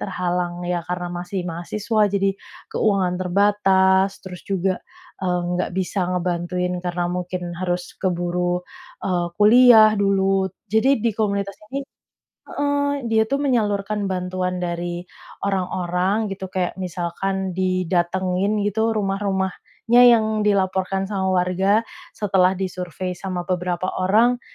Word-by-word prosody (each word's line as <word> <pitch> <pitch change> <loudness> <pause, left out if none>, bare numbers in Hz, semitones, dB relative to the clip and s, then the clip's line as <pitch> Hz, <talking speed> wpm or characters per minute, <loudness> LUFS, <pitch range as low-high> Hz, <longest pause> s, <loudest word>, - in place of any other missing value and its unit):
terhalang, 180 -2 -2
ya 175 -1 0
karena 180 0 -3
masih 180 +1 -4
mahasiswa 210 +7 -2
jadi, 195 0 +2 0.4
keuangan 195 -4 +1
terbatas 190 0 +3
terus 180 -2 -9
juga, 190 -1 -1 0.4
eee, 180 -1 +1
nggak 180 +1 -1
bisa 190 +1 -1
ngebantuin 180 0 -1
karena 175 0 -1
mungkin 180 0 -3 0.2
harus 180 -1 -3
keburu, 180 -1 0 0.4
eee, 175 -2 0
kuliah 220 0 +8
dulu. 195 -1 +2 0.2
Jadi 220 +4 +3 0.2
di 230 - +3
komunitas 200 -2 -1 0.2
ini 275 - -1 0.7
heeh, 285 -1 0
dia 220 -1 +4
tuh 275 - 0
menyalurkan 210 -6 0
bantuan 180 0 -2
dari 175 0 -3 0.4
orang-orang 185 +2 0
gitu 190 -1 -7
kayak, 185 -1 -1
misalkan 185 +1 -3
didatengin 185 +2 0
gitu 220 +2 +1
rumah 195 -2 0
rumahnya 195 +4 +1
yang 220 -1 +1
dilaporkan 190 -1 +1
sama 190 -2 -1
warga, 195 +5 +1 0.3
setelah 190 -3 +3
disurvei 180 -1 -4
sama 185 0 -4
beberapa 180 0 -1
orang, 225 +6 +2
190 Hz, 115 wpm, -22 LUFS, 180-205 Hz, 0.7 s, kuliah